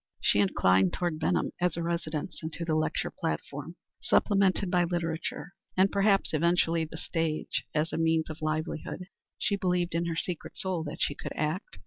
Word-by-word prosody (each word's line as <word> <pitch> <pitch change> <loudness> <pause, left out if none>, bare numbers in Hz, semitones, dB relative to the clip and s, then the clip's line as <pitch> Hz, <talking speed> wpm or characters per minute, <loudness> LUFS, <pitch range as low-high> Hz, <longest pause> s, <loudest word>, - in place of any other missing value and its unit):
She 100 - +3
inclined 95 -2 +4
toward 175 -3 -1
Benham - - +1
as 180 -2 +1
a 170 - -1
residence, 170 0 -2
and 160 0 -4
to 170 - -3
the 160 - 0
lecture 155 0 0
platform, - - -4 0.3
supplemented 195 -2 +3
by 180 -1 +4
literature, 170 0 -3 0.2
and 190 +1 +5
perhaps 200 -2 +3
eventually 170 0 +2
the 160 - -9
stage, 165 -2 -1
as 155 +2 +1
a - - -1
means 160 -1 +2
of 155 0 -8
livelihood. 155 +3 -2 0.3
She 200 - 0
believed 180 -2 0
in 170 +1 +1
her 165 - -1
secret 170 0 -4
soul 185 -4 -1
that 145 - -6
she - - +2
could - - -6
act. 155 +5 -2
165 Hz, 175 wpm, -29 LUFS, 155-180 Hz, 0.3 s, and